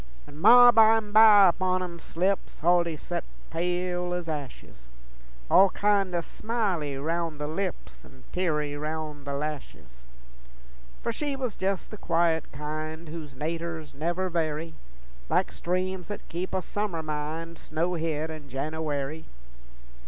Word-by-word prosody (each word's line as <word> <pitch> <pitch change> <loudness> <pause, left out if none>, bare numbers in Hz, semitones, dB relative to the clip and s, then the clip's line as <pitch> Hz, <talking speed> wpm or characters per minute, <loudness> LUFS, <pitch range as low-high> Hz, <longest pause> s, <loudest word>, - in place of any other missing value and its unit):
When 145 - -13
Ma 245 +7 +9
bimeby 220 -2 +7
upon 185 +1 0
'em 170 -1 -7
slips, 190 +5 -1
Huldy 170 -1 +3
sot - - -4 0.3
pale 180 +1 -1
ez 175 -2 -4
ashes, 135 - -7 0.6
All 195 - +6
kin' 200 -2 +1
o' 170 - +1
smily 185 - -2
roun' 165 +2 -2
the 150 - -4
lips 160 - -4
An' 65 0 -17
teary 150 -5 -1
roun' 150 -1 -5
the 140 - -3
lashes. 135 - -6 1.0
For - - 0
she 285 +4 -3
was 255 -6 -4
jes' 190 0 0
the 215 - -10
quiet 165 -4 +1
kind 155 +2 -5
Whose 155 -4 -8
naturs 160 +1 -4
never 175 +6 -1
vary, 165 -2 -2 0.6
Like - - +2
streams 185 +1 -2
that 205 - -7
keep 175 +3 -4
a 185 - -1
summer 200 -6 -3
mind 155 +2 -4
Snowhid 160 -1 -2
in 155 -3 -9
Jenooary. 150 +2 -3
165 Hz, 130 wpm, -27 LUFS, 150-185 Hz, 1.0 s, Ma